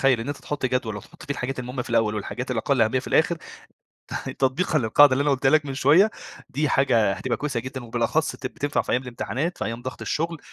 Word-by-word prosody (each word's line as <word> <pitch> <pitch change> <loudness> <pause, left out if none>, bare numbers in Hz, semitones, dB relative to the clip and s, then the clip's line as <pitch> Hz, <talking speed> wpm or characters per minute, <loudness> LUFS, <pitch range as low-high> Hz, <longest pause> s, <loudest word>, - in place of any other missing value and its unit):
تخيّل. 130 -4 +4
إن 120 - -5
أنت 145 - -3
تحط 145 -3 -3
جدول، 125 -4 -1
وتحط 105 - -12
فيه 145 - -3
الحاجات 130 0 -4
المهمّة 125 0 -4
في - - -10
الأول، 115 -2 +2
والحاجات 125 +5 -4
الأقل 130 +1 +1
أهمية 110 +4 +2
في - - -7
الآخر، 170 +2 +3 1.0
تطبيقًا 140 +4 +1
للقاعدة 130 +4 +6
اللي 135 - +2
أنا 145 - +2
قولتها 135 0 +2
لك 150 -1 +3
من 135 - -4
شويّة. 155 +11 +5 0.4
دي 150 +3 0
حاجة 115 -9 +3
هتبقى - - -2
كويسة 140 -5 -2
جدًا، 130 +1 -7
وبالأخص 120 +7 0
بت - - -5
بتنفع 145 0 -1
في - - -3
أيام 125 - +2
الامتحانات، 130 +6 -3
في - - -2
أيام 115 +1 -4
ضغط 130 0 -6
الشغل، 165 +1 -2
130 Hz, 220 wpm, -24 LUFS, 120-145 Hz, 1.0 s, للقاعدة